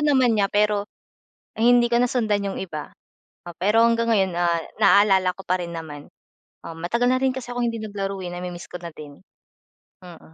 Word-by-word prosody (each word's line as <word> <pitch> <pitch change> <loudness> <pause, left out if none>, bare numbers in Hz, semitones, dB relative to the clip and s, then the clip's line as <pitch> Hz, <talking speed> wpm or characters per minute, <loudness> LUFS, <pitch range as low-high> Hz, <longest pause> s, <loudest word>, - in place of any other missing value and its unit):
naman 265 -5 +3
niya 205 -2 +2
pero, 205 0 +1 0.7
hindi 240 +1 +5
ko 235 - +4
nasundan 220 -5 0
'yung 195 - -5
iba. 155 -5 -7 0.6
Oh, 175 - -8
pero 210 +6 +3
hanggang 230 0 +1
ngayon, 195 -3 +2
ah, 170 -1 +1 0.2
naalala 195 -3 +5
ko 195 - -10
pa 185 +1 +1
rin 170 0 -7
naman. 150 -3 -8 0.6
Oo, 165 - -7
matagal 235 +9 0
na 255 - +1
rin 265 - +3
kasi 245 -2 -6
akong 245 -1 0
hindi 230 - -5
naglaro, 200 -2 -4
eh. - - -5
Nami-miss 175 -1 -7
ko 180 - -6
na 170 - -6
din. 145 -2 -12 0.8
Mm. 175 -2 -12
200 Hz, 185 wpm, -23 LUFS, 175-230 Hz, 0.8 s, hindi